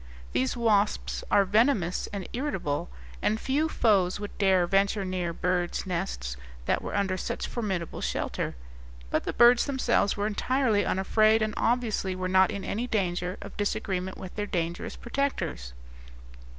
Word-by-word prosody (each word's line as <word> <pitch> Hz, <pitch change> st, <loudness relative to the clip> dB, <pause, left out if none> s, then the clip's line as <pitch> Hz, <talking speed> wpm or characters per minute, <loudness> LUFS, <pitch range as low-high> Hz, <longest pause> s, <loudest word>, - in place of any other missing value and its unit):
These 130 Hz, -, 0 dB
wasps 210 Hz, -3 st, +1 dB
are 200 Hz, -, +5 dB
venomous 205 Hz, -3 st, +2 dB
and 200 Hz, -3 st, -5 dB
irritable, 190 Hz, -, -2 dB, 0.3 s
and 215 Hz, +1 st, +1 dB
few 295 Hz, +6 st, 0 dB
foes 200 Hz, -9 st, +2 dB
would 205 Hz, 0 st, -6 dB
dare 190 Hz, -3 st, +4 dB
venture 195 Hz, +2 st, +2 dB
near 180 Hz, -2 st, -2 dB
bird's 180 Hz, +1 st, -1 dB
nests 165 Hz, -, -3 dB, 0.3 s
that -, -, +1 dB
were -, -, -5 dB
under 195 Hz, -2 st, 0 dB
such -, -, -3 dB
formidable 190 Hz, -8 st, -3 dB
shelter; -, -, -2 dB, 0.6 s
but -, -, 0 dB
the -, -, -1 dB
birds 240 Hz, +2 st, +6 dB
themselves 265 Hz, -7 st, +1 dB
were 205 Hz, -, 0 dB
entirely 220 Hz, 0 st, +1 dB
unafraid, 215 Hz, +3 st, +3 dB
and 215 Hz, 0 st, -1 dB
obviously 225 Hz, -6 st, 0 dB
were 185 Hz, 0 st, -2 dB
not 185 Hz, 0 st, +5 dB
in 200 Hz, -, -4 dB
any 235 Hz, +4 st, -2 dB
danger 180 Hz, -4 st, -1 dB
of 200 Hz, -, -10 dB
disagreement 190 Hz, -2 st, -2 dB
with 185 Hz, -1 st, -9 dB
their 210 Hz, -1 st, -2 dB
dangerous 170 Hz, -2 st, -3 dB
protectors. 235 Hz, -, -2 dB
200 Hz, 150 wpm, -28 LUFS, 180-220 Hz, 0.6 s, birds